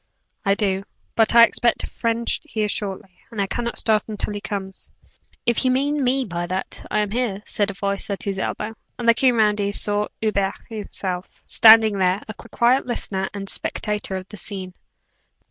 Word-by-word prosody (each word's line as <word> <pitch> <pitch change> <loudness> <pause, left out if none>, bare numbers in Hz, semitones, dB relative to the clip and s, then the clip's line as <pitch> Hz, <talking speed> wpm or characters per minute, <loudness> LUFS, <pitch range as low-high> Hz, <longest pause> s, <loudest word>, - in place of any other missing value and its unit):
"I 195 -1 +3
do; 195 -2 0 0.3
but 225 +1 +3
I 235 - +10
expect 235 0 +2
a - - -3
friend 230 0 -2
here 220 -9 -2
shortly, 195 -2 -5
and 200 -3 -2
cannot 235 0 -2
start 215 -2 +3
until 210 -1 -3
he 205 - -5
comes." 195 -2 -6 0.6
"If 235 +1 +2
you 260 - +3
mean 280 +3 +1
me 260 +1 +2
by 175 -3 -3
that, 185 +2 -4
I 210 - +1
am 205 -1 -2
here," 220 -4 -1
said 205 -1 -1
a 200 - -6
voice 200 +1 -3
at 200 - -3
his 195 -1 -2
elbow; 210 +3 -3 0.2
and, 240 - -3
looking 245 +2 +5
round, 210 -2 +3
he 200 0 0
saw 205 0 +1
Hubert 200 -3 0
himself, 195 -4 -5 0.2
standing 220 -2 +7
there, 185 +1 +2
a 215 - -5
quiet 245 +5 +1
listener 190 -5 -2
and 200 -1 -6
spectator 210 -1 -2
of 185 0 -5
the 210 - -9
scene. 185 -1 -6
210 Hz, 180 wpm, -22 LUFS, 195-230 Hz, 0.6 s, I